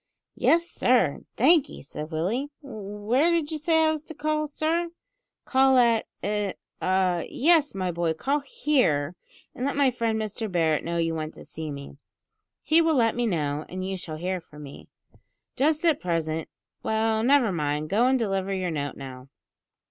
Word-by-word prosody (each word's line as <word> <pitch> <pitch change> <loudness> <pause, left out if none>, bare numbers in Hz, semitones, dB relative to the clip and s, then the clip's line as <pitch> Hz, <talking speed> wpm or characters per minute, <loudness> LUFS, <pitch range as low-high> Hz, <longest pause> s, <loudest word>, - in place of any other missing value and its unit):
"Yes, 340 +1 +3
sir, 245 - +3
and - - -12
thankee," 295 - +3
said 150 +2 -7
Willie; 195 - -1
"where 220 +4 -1
did 335 -3 0
you 310 - -3
say 320 +1 +3
I 315 - +3
was 310 -1 -4
to 320 - -10
call, 305 0 -1
sir?" 325 +4 -1 0.6
"Call 265 0 +4
at 235 -3 +3 0.2
eh 205 -1 -1 0.3
ah 185 -2 +2
yes, 305 - +3
my 185 -2 -1
boy, 170 -1 -1
call 275 - 0
here, 250 - +1 0.4
and 250 - -6
let 280 - 0
my 280 -2 +3
friend 230 -2 -1
Mr 215 0 -4
Barret 160 -3 +1
know 170 0 -2
you 165 -1 0
want 155 -1 -4
to - - -12
see 160 -1 -6
me. 140 -1 -8 0.7
He 320 +2 +4
will 325 -1 +2
let 230 -4 +3
me 240 0 0
know, 150 -6 -1
and 185 +1 -4
you 195 - -2
shall 160 -4 -6
hear 180 +2 -2
from 150 -2 -13
me. 140 -1 -11 0.7
Just 305 +4 +1
at 325 -4 +3
present 160 -2 -2 0.3
well, 220 0 +1
never 250 -2 +4
mind, 150 -2 -2
go 230 +5 +4
and 260 0 +3
deliver 195 -4 -1
your 185 -2 -1
note 145 -2 -3
now. 130 -1 -9
215 Hz, 180 wpm, -26 LUFS, -, 0.7 s, Call